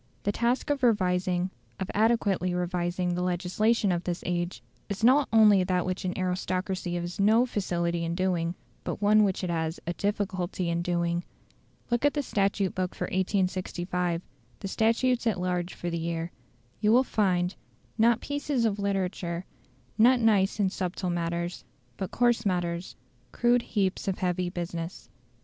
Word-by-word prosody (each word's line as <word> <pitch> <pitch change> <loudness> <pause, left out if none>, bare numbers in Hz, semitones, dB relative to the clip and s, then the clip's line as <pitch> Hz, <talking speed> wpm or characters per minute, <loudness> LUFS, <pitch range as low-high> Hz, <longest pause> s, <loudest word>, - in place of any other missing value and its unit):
The 205 - +1
task 240 +6 0
of 285 -2 -1
revising, 185 -5 +2 0.3
of 190 - -3
adequately 205 -5 +2
revising 180 0 -1
the 180 - -1
legislation 185 +4 +1
of 175 0 -1
this 175 -1 -3
age, 175 0 -2 0.3
is 200 +1 -4
not 260 +4 +5
only 210 -4 +6
that 180 -1 0
which 185 +1 -3
an 180 - -2
aristocracy 185 0 -2
has 175 +3 -4
no 220 +5 +5
facility 175 -6 -1
in 165 0 -2
doing, 175 -2 0 0.3
but - - -4
one 210 +1 +5
which 195 -1 0
it 180 - -1
has 160 0 -2
a 175 - -2
difficulty 190 -3 -2
in 170 0 0
doing. 170 0 0 0.7
Look 240 +1 +1
at 290 0 +3
the 290 - 0
statute 195 -4 0
book 185 -1 -2
for - - -3
1865 180 -2 -1 0.4
the - - -3
statutes 235 +4 +1
at 205 -5 +1
large 180 0 -2
for 175 - -4
the 170 - -2
year. 165 +1 -3 0.5
You 210 0 +3
will 250 +3 +6
find, 185 -6 +1 0.4
not 230 +1 +3
pieces 285 -4 -1
of 210 -2 0
literature, 185 -3 -2 0.5
not 245 +3 +6
nice 210 -3 +3
and 195 -2 +2
subtle 180 -1 -2
matters, 170 0 -2 0.3
but 190 - -3
coarse 240 -1 +2
matters, 175 -3 -2 0.4
crude 240 0 +3
heaps 195 -5 -1
of 190 - 0
heavy 180 -1 -1
business. 170 0 -5
185 Hz, 160 wpm, -28 LUFS, 175-210 Hz, 0.7 s, only